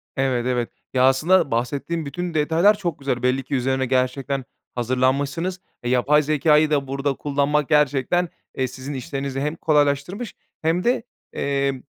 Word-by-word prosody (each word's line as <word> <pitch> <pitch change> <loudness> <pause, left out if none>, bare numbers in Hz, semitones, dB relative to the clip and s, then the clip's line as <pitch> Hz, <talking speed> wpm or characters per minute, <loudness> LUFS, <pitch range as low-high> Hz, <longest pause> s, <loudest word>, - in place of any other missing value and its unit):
Evet, 130 -3 0
evet, 125 -2 0 0.2
ya, 130 0 +3
aslında 155 +5 +4
bahsettiğin 140 +8 -2
bütün 175 +4 -4
detaylar 165 +7 +3
çok 170 -7 -3
güzel. 130 -3 -2
Belli 130 +1 +1
ki 140 - -3
üzerine 130 +1 0
gerçekten 130 +1 0 0.3
hazırlanmışsınız. 135 +8 0 0.3
Yapay 130 +5 +3
zekâyı 150 +1 +3
da 140 -2 +1
burada 135 +1 -1
kullanmak 145 +1 0
gerçekten, 150 +3 +2 0.3
eee, 130 - +1
sizin 130 +3 -7
işlerinizi 135 +1 -4
hem 150 +3 -1
kolaylaştırmış 150 - 0 0.3
hem 165 +3 +1
de, 240 -1 +1 0.3
emm, 140 -2 -1
140 Hz, 140 wpm, -22 LUFS, 130-155 Hz, 0.3 s, aslında